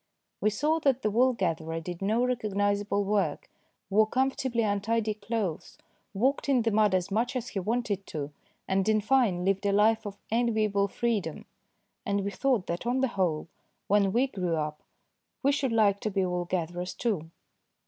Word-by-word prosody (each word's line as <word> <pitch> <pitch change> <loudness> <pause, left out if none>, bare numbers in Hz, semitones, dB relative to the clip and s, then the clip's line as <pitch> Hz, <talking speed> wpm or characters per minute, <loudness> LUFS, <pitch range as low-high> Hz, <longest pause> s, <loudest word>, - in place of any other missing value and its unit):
We 215 - +3
saw 300 +10 +1
that 270 -4 +1
the 215 - +1
wool 250 +4 +4
gatherer 165 -6 -2
did 175 +2 -7
no 215 +4 +1
recog 240 -5 -1
nisable 205 0 +1
work, 205 0 -1 0.4
wore 215 +2 +5
comfortably 260 -1 0
untidy 215 +1 0
clothes, 210 -5 -4 0.4
walked 265 +7 +1
in 255 -4 +3
the 225 - +1
mud 210 -2 +3
as 185 +1 -1
much 240 +6 0
as 250 -1 -3
he 195 - -3
wanted 210 -1 -2
to, 150 -2 -5 0.4
and, 195 +2 +1
in 215 0 +4
fine, 215 -6 +2
lived 195 +1 +1
a 200 - +2
life 215 +2 +3
of 200 0 -7
enviable 215 -4 +2
freedom; 200 -7 -2 0.6
and 200 0 0
we 200 - -2
thought 250 -5 +1
that 170 +7 -4
on 255 +2 +1
the 265 - +2
whole 175 -8 -1 0.4
when 200 -1 +3
we 245 +6 +3
grew 180 -9 -2
up 150 -1 -3 0.6
we 280 - +4
should 275 -3 0
like 210 -3 +3
to 215 - -2
be 195 -2 0
wool 180 -1 -2
gatherers 175 0 -3
too. 190 -10 -2
210 Hz, 180 wpm, -28 LUFS, 190-235 Hz, 0.6 s, wore